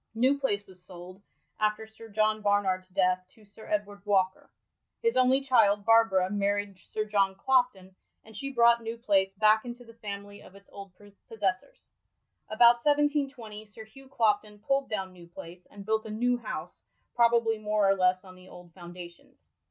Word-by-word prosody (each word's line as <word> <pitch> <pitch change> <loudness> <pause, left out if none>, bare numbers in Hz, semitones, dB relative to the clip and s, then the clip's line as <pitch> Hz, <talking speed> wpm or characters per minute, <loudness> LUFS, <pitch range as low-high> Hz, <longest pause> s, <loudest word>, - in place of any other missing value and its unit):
New 260 +5 +2
Place 205 -7 -1
was 185 -1 -16
sold, 180 +1 -12 0.4
after 215 +1 0
Sir 220 +1 -15
John 215 +1 0
Barnard's 195 -3 0
death, 185 -1 +1
to 220 - -20
Sir 205 +2 -15
Edward 205 -1 -3
Walker. 190 -2 0 0.5
His 460 0 +1
only 255 +1 +3
child, 215 -7 +3
Barbara, 225 -5 +4
married 205 -1 -2
Sir 215 +5 -5
John 200 -2 +1
Clopton, 195 -5 0 0.3
and 220 0 -16
she 275 +6 -5
brought 235 -2 +4
New 225 +1 -6
Place 195 -4 +1
back 215 +1 +4
into 245 0 -9
the 230 - -15
family 205 -2 -8
of 190 - -16
its 200 0 -17
old 200 -1 -11 0.4
possessors. 200 - -4 0.6
About 235 +2 +5
1720, 285 -7 0
Sir 210 +2 -12
Hugh 265 +5 -17
Clopton 210 -4 0
pulled 275 +6 -1
down 190 -3 -4
New 175 -2 -15
Place, 175 +1 -12
and 200 -1 -12
built 220 +1 -1
a - - -8
new 245 +3 0
house, 240 - -7 0.3
probably 235 -2 +2
more 210 -1 +1
or 195 - +5
less 185 0 +1
on 185 - -13
the 185 0 -16
old 175 -1 -14
foundations. 175 -1 -13
210 Hz, 170 wpm, -28 LUFS, 195-230 Hz, 0.6 s, About